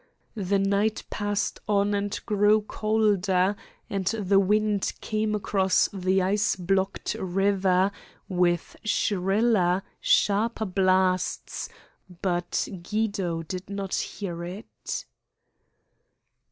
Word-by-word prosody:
The 200 -2 0
night 200 +2 +1
passed 205 -1 -1
on 205 0 +2
and 205 +1 -1
grew 210 0 +4
colder, 205 -3 +1 0.3
and 195 -2 -3
the 200 -3 +2
wind 210 +1 +1
came 215 0 -1
across 195 -2 +2
the 190 0 +1
ice 205 +2 +1
blocked 190 +1 -1
river 190 0 +2 0.4
with 175 -2 0
shriller, 195 -2 +2 0.2
sharper 220 +2 +2
blasts, 185 -1 +1 0.5
but 175 -2 0
Guido 195 -4 -1
did 185 +3 -6
not 200 -1 -4
hear 170 -4 -3
it. 185 +5 -6
195 Hz, 95 wpm, -26 LUFS, 185-210 Hz, 0.5 s, grew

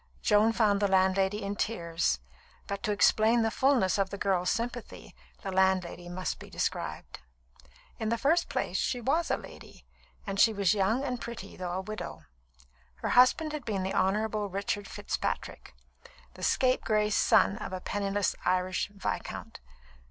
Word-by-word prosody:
Joan 210 +1 +4
found 210 -3 +2
the 205 - +3
landlady 190 +2 +2
in 200 +1 -3
tears; 170 - -1 0.5
but 200 0 -4
to 215 - -1
explain 220 +3 +4
the 225 - +1
fulness 245 -10 +2
of 195 -1 +1
the 200 - -6
girl's 185 -2 +1
sympathy, 240 0 -4 0.3
the 195 - -3
landlady 185 -2 +1
must 185 +1 -3
be - - -11
described. - - -4 0.8
In 220 - -1
the 230 - +1
first 325 +7 +2
place, - - -1
she 245 - 0
was 295 +8 0
a - - +1
lady; - - -13 0.4
and 195 -1 -3
she 225 - +6
was 200 -2 +2
young 215 +6 +1
and 250 -3 -3
pretty, 235 -4 -7
though 180 -1 -4
a 185 - -2
widow. 215 +2 -7 0.7
Her 65 - -4
husband 300 +5 +4
had 300 -3 -4
been 205 -5 -2
the 190 - -2
Honourable 210 +2 0
Richard 200 +1 -3
Fitzpatrick, - - -4 0.6
the - - -13
scapegrace 215 -5 +2
son 195 - +4
of - - -6
a 185 - -4
penniless 200 0 -1
Irish 185 0 0
viscount. 200 -1 -5
205 Hz, 160 wpm, -29 LUFS, 190-225 Hz, 0.8 s, she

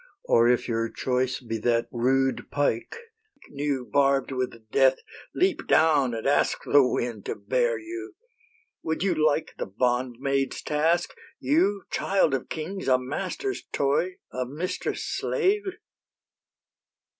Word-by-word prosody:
Or 115 +1 +4
if 125 - +2
your 115 -1 -1
choice 130 +1 -1
be 115 -3 -4
that 115 +1 +1
rude 130 +2 +1
pike, 140 -5 -1 0.5
New 140 -3 -2
barb'd 140 -1 +2
with 125 -4 -4
death, 135 -1 +5 0.4
leap 370 0 +1
down 145 -6 +4
and 110 - -5
ask 140 - +2
The 145 - +5
wind 120 -4 -2
to - - -2
bear - - 0
you. 360 +1 -8 0.7
Would 160 +2 -2
you 195 -2 +2
like 155 0 +1
The - - -2
bondmaid's 125 +5 -1
task, 160 +3 +1 0.3
You, 185 +9 +2
child 190 -7 +2
of 135 - -2
kings, 185 +5 -5
a 130 -1 +5
master's 185 - -4
toy, 145 +7 +1 0.2
A 130 - -1
mistress' 150 +9 -3
slave?'" 415 -1 0
140 Hz, 130 wpm, -26 LUFS, 125-175 Hz, 0.7 s, death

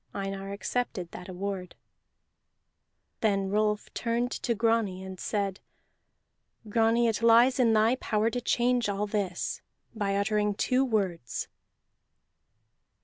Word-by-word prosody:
Einar 195 0 -4
accepted 200 -3 -3
that 180 +1 -9
award. 185 0 -5 1.4
Then 195 -3 +1
Rolf 210 0 0
turned 240 +1 -1
to 235 - -1
Grani, 225 -4 +1
and 190 -1 -8
said: 200 -2 -2 1.1
"Grani, 225 +2 +3
it 225 -1 0
lies 235 +3 +5
in 230 -3 +4
thy 220 +4 +3
power 220 -1 0
to 245 - -2
change 245 -2 +1
all 200 +1 -1
this 200 -4 -2 0.3
by 200 -3 -1
uttering 210 0 +1
two 255 +5 +2
words." 190 - -2
210 Hz, 115 wpm, -28 LUFS, 195-230 Hz, 1.4 s, lies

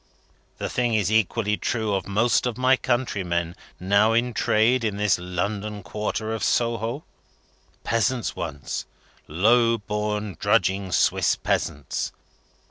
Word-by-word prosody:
The - - -3
thing 120 -2 0
is 105 -2 +1
equally 110 -1 +1
true 110 -3 -1
of 95 - -2
most 115 +5 +2
of 125 - -3
my 130 +1 +4
countrymen, 95 -10 -1 0.2
now 100 +4 +3
in 120 +1 +1
trade 115 +4 +2
in 105 -3 -1
this 105 -3 +2
your 90 - -8
London 100 +3 -3
quarter 110 +2 -3
of 110 -2 -3
Soho. 115 +4 0 0.8
Peasants 115 +1 0
once; 70 -6 -5 0.4
low 115 +8 +3
born 105 -2 -3
drudging 95 0 +1
Swiss - - +2
Peasants. 70 - -2
105 Hz, 125 wpm, -24 LUFS, 95-115 Hz, 0.8 s, my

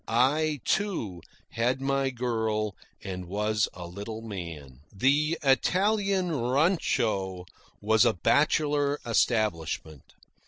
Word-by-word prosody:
I, 145 +5 +2
too, 115 - -1 0.3
had 125 +3 0
my 135 0 0
girl, 110 -4 -1 0.3
and 90 -2 -5
was 105 +2 0
a 90 - -7
little 105 +5 -7
man. 85 - -7
The 145 - +2
Italian 190 +5 +2
rancho 120 - 0 0.4
was 110 +1 +4
a - - +4
bachelor 145 - +2
establishment. 85 - -1
115 Hz, 95 wpm, -27 LUFS, 100-145 Hz, 0.4 s, was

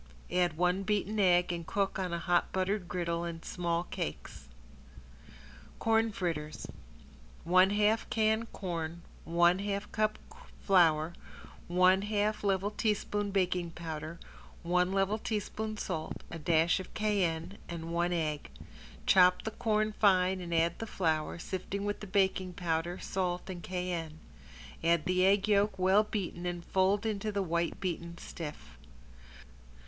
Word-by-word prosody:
Add 175 -3 +1
one 180 +2 +2
beaten 210 +1 -1
egg 180 -2 +4
and 170 -1 -3
cook 195 -1 -1
on 185 -2 -2
a 170 - -1
hot 175 0 +1
buttered 190 0 -1
griddle 170 0 -2
in 170 -1 -5
small 170 -1 -1
cakes. 75 - -6 1.3
~CORN 225 0 +2
FRITTERS~ 165 -6 -3 0.8
One 185 +3 +5
half 210 +2 +2
can 220 +1 +1
corn, 170 -4 -5 0.2
one 175 +2 +4
half 200 0 -3
cup 215 -1 0 0.5
flour, 165 -4 +4 0.5
one 185 +2 +4
half 210 +1 0
level 200 0 +1
teaspoon 210 -1 -1
baking 180 -3 0
powder, 160 -1 -6 0.4
one 180 +1 +2
level 195 +2 +1
teaspoon 215 0 -3
salt, 160 -6 -4
a 165 - -6
dash 165 +3 +3
of 185 - -9
cayenne 195 -4 0
and 165 -1 -5
one 175 +1 +1
egg. 155 - -2 0.6
Chop 180 -1 +5
the 220 - -3
corn 215 -1 0
fine 190 -3 +3
and 175 -1 -6
add 165 0 +1
the 225 - -4
flour, 160 -7 -1
sifted 190 +3 -4
with 205 0 -2
the 210 - -8
baking 190 -1 +1
powder, 170 0 -1
salt 180 0 -2
and 175 -2 -7
cayenne. 175 -3 -4 0.7
Add 165 -1 +3
the 185 0 +2
egg 200 +1 +3
yolk, 205 -1 +3
well 190 +3 +5
beaten 185 -5 -4
and 175 -1 -4
fold 195 +3 +2
in 215 -2 -1
the 205 -1 -1
white 170 -1 -1
beaten 170 -2 -4
stiff. 150 - -8
180 Hz, 140 wpm, -31 LUFS, 170-200 Hz, 1.3 s, One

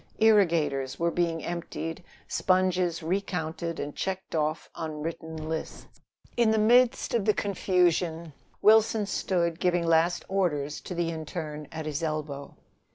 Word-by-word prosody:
Irrigators 170 -11 +3
were 170 0 +1
being 165 -2 -1
emptied, 170 0 -5 0.2
sponges 185 -2 +1
recounted 170 -2 -2
and 145 0 -4
checked 190 0 -4
off 155 0 -1
on 155 -2 -5
written 160 -1 -5
lists. 160 0 -5 0.5
In 235 -2 +4
the 220 - +3
midst 240 +3 +4
of 230 -4 +1
the 215 - +3
confusion, 175 -4 +1 0.3
Wilson 220 0 +5
stood 170 -4 -1
giving 175 -1 +1
last 165 +1 +2
orders 150 -7 -1
to 180 - -5
the 170 -1 0
interne 155 -2 -6
at 160 -1 -5
his 150 -1 -3
elbow. 150 -3 -4
170 Hz, 135 wpm, -28 LUFS, 160-185 Hz, 0.5 s, Wilson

